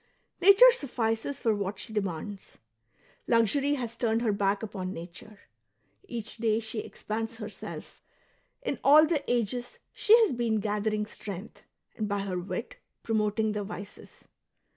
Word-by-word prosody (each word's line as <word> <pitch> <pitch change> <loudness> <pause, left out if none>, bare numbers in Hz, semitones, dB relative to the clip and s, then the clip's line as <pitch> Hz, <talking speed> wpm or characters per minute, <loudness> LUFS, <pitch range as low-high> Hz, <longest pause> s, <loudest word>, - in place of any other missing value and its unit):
Nature 400 +7 +9
suffices 245 - -2
for 225 - +2
what 200 -1 -3
she 220 - -8
demands. 195 0 -4 0.7
Luxury 255 +6 +3
has 235 -4 -5
turned 230 0 0
her 225 - +2
back 200 +1 0
upon 190 -4 -4
nature; 180 +4 -10 0.7
each 235 - -5
day 225 -1 +1
she 220 0 -4
expands 225 +2 -4
herself, 210 -3 -8 0.6
in - - -2
all 300 +3 +8
the 310 -3 0
ages 245 +1 -1 0.2
she' 450 +1 +6
has 440 - +3
been 235 -3 0
gathering 210 +1 -1
strength^ 200 -1 -8 0.4
and 215 - -2
by 205 -1 -1
her 185 -2 -2
wit 180 +3 -5 0.3
promoting 220 0 +1
the 210 -1 -2
vices. 200 0 -10
220 Hz, 140 wpm, -28 LUFS, 205-240 Hz, 0.7 s, Nature